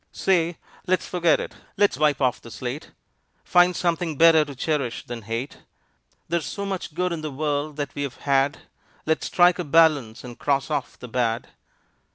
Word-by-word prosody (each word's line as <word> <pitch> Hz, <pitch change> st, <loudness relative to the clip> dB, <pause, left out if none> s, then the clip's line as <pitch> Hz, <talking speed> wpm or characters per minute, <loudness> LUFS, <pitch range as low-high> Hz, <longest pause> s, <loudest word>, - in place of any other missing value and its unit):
Say! 175 Hz, -3 st, +1 dB, 0.3 s
Let's 185 Hz, 0 st, +1 dB
forget 170 Hz, -3 st, +2 dB
it! -, -, -6 dB, 0.2 s
Let's 205 Hz, 0 st, +3 dB
wipe 150 Hz, -2 st, +1 dB
off 125 Hz, -1 st, +1 dB
the 115 Hz, -, -11 dB
slate, 125 Hz, +5 st, -6 dB, 0.5 s
Find 180 Hz, 0 st, +4 dB
something 165 Hz, -3 st, -1 dB
better 165 Hz, 0 st, +7 dB
to 145 Hz, -2 st, -9 dB
cherish 140 Hz, -3 st, -2 dB
than 120 Hz, -1 st, -6 dB
hate. 115 Hz, +6 st, -5 dB, 0.7 s
There's 170 Hz, -1 st, -1 dB
so 200 Hz, -, -4 dB
much 190 Hz, -6 st, -5 dB
good 180 Hz, +1 st, 0 dB
in 165 Hz, -, -4 dB
the 155 Hz, -, -4 dB
world 145 Hz, +1 st, -2 dB
that 145 Hz, -3 st, -4 dB
we've 140 Hz, -3 st, -4 dB
had, 140 Hz, +1 st, +1 dB, 0.4 s
Let's 160 Hz, 0 st, 0 dB
strike 180 Hz, 0 st, +4 dB
a -, -, 0 dB
balance 150 Hz, -7 st, +3 dB
and 120 Hz, -2 st, -10 dB
cross 140 Hz, +1 st, 0 dB
off 145 Hz, -3 st, -3 dB
the 125 Hz, -, -9 dB
bad. 115 Hz, -1 st, -1 dB
150 Hz, 175 wpm, -24 LUFS, 135-170 Hz, 0.7 s, better